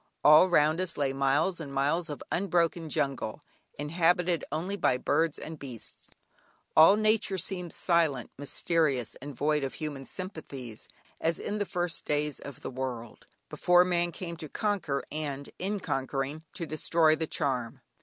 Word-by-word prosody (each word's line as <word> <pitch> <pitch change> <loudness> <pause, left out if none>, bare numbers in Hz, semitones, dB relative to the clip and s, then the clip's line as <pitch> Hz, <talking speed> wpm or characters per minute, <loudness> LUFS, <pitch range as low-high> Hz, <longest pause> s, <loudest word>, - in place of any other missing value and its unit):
All 155 +5 +8
round 155 0 +4
us 185 -3 -2
lay 140 -2 +1
miles 135 +7 +1
and 145 -4 -6
miles 145 +5 0
of 145 - -6
unbroken 170 -3 +1
jungle, 135 -2 -2 0.3
inhabited 170 +2 +1
only 170 +6 -2
by 125 - +2
birds 160 +4 +1
and 160 -1 -7
beasts; 125 -5 -8 0.7
all 160 +6 +8
nature 215 -2 +2
seemed 180 -1 -2
silent, 160 -8 +1
mysterious, 145 -3 0
and 145 0 -7
void 150 +2 +1
of 135 - -3
human 145 -4 -5
sympathies 135 - -7 0.3
as 165 0 +1
in 210 - -3
the 205 - -1
first 175 -1 -1
days 150 0 -1
of 140 -3 -9
the - - -5
world, 125 -3 -5 0.2
before 180 0 +4
man 175 -1 +1
came 170 -1 -6
to 155 -2 -7
conquer, 190 -10 -1
and 145 -2 -4
in 200 +2 -1
conquering 135 0 -2
to 170 - -4
destroy 155 0 +3
the 160 0 -3
charm. 130 -7 -2
155 Hz, 155 wpm, -29 LUFS, 140-175 Hz, 0.7 s, All